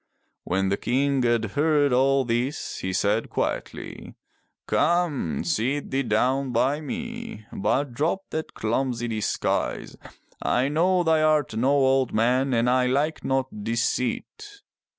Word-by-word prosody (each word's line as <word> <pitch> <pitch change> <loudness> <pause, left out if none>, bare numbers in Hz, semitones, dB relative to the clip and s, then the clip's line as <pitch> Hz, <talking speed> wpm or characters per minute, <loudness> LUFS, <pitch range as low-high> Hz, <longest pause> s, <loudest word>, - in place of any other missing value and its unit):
When 95 +2 0
the 100 - 0
King 135 +1 +1
had 120 -2 +2
heard 145 -1 +2
all 135 +1 +3
this 120 +5 -2
he 95 - -3
said 105 +4 0
quietly: - - -4 0.5
"Come, 165 - +1
sit 135 +6 -1
thee 135 +1 +1
down 130 +3 +1
by 130 +5 +1
me, 235 - -6
but 125 +6 0
drop 160 +9 0
that 160 0 -4
clumsy 120 +1 -1
disguise. 110 -3 -2 0.5
I 130 +3 +1
know 175 +4 +2
thou 160 -2 +3
art 155 -6 +2
no 125 +4 +1
old 135 -2 +2
man 125 +4 +2
and 120 -1 +2
I 125 0 +3
like 145 +5 0
not 130 -5 -2
deceit." 125 - -2
135 Hz, 130 wpm, -25 LUFS, 120-150 Hz, 0.5 s, all